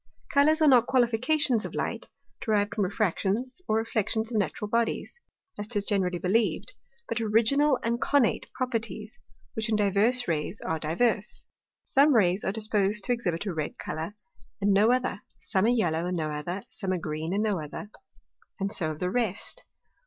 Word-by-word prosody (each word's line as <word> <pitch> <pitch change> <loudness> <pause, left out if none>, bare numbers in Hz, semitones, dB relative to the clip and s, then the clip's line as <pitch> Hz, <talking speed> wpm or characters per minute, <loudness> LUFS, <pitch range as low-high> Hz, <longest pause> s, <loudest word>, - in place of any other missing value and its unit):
Colours 310 +3 +4
are - - +6
not 245 -4 +6
Qualifications 250 0 +2
of - - -6
Light, - - -3 0.4
derived 205 -2 +1
from 205 -3 +1
Refractions, 215 - -1
or 215 - +1
Reflections 225 0 -1
of 220 - +1
natural 210 +1 -2
Bodies, 235 - -1 0.4
(as 205 - -4
'tis 205 -3 -2
generally 190 -4 +1
believed) 220 - 0 0.4
but 240 - -2
Original 235 +6 +3
and 235 +1 -1
connate 280 -6 +2
Properties, 225 -4 -3 0.3
which 220 0 -2
in 220 - +2
divers 210 +5 +2
Rays 165 +5 -2
are 160 0 -2
divers. 200 +7 0 0.4
Some 280 +1 +4
Rays 190 -2 +3
are - - 0
disposed 210 -1 +1
to 245 - +2
exhibit 185 -6 -2
a 195 - -2
red 155 -2 -4
Colour 160 +6 -5 0.4
and 200 0 +3
no 210 +4 +5
other; 255 -5 0 0.2
some 195 0 0
a - - +4
yellow 175 -8 +1
and 180 0 -2
no 155 -2 -2
other, 175 +6 -4
some 190 - -3
a - - 0
green 155 0 -4
and 205 +3 +1
no 205 -6 0
other, 205 +8 -8 0.7
and 195 +1 -1
so 160 -3 +1
of 155 -1 -6
the 180 0 -1
rest. 230 - -2
210 Hz, 175 wpm, -27 LUFS, 185-235 Hz, 0.7 s, are